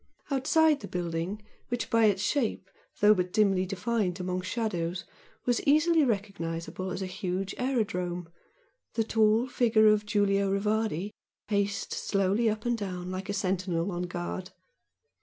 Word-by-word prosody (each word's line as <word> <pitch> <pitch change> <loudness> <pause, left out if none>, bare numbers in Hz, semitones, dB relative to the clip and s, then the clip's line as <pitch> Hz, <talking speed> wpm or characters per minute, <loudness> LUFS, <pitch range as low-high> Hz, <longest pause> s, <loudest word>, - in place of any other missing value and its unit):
Outside 300 +3 +3
the - - -8
building 175 +4 -3 0.2
which, 245 0 -3
by 230 -1 +5
its 200 -2 +2
shape, 220 -7 -1 0.3
though 210 +1 +7
but 180 -2 -1
dimly 195 -3 +2
defined 195 -1 -1
among 180 0 -2
shadows, 185 -4 -2 0.4
was 245 -1 +2
easily 310 +2 +4
recognisable 190 -6 -3
as 185 +1 -3
a - - -2
huge 185 +1 -3
aerodrome, 180 -9 -1 0.7
the 225 - +2
tall 220 +1 +3
figure 225 -4 +3
of 210 0 +2
Giulio 200 -1 +2
Rivardi 210 -1 0 0.4
paced 200 -1 -1
slowly 200 +3 +1
up 215 +1 -3
and 240 0 +2
down 185 -4 -5
like 185 +2 -5
a - - 0
sentinel 185 -2 -1
on 175 0 -3
guard. 180 +1 -4
200 Hz, 140 wpm, -29 LUFS, 185-220 Hz, 0.7 s, though